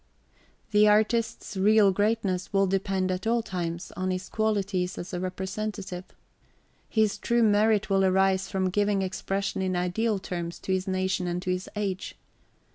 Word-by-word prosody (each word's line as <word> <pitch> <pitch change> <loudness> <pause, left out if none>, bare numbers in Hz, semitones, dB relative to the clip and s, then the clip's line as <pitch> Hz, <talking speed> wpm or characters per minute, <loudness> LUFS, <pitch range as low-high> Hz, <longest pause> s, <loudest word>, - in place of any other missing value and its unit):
The 210 0 +5
artist's 220 +1 +1
real 205 +1 +5
greatness 205 -2 0
will 195 -1 +3
depend 190 0 0
at 185 +4 -3
all 235 0 +2
times 170 -3 -4
on 185 0 -3
his 185 0 -3
qualities 200 -4 -1
as 175 - -7
a 180 - -2
representative. 190 0 -4 0.8
His 220 -2 +1
true 235 0 +2
merit 210 0 +3
will 195 -1 +2
arise 190 0 +2
from 190 -2 0
giving 205 0 +1
expression 195 +1 -2
in 185 -1 0
ideal 195 +5 0
terms 175 -2 -5
to - - -4
his 185 +1 -1
nation 185 -1 0
and 175 0 -1
to 185 - -1
his 185 +1 -3
age. 195 -3 -3
195 Hz, 155 wpm, -27 LUFS, 185-210 Hz, 0.8 s, The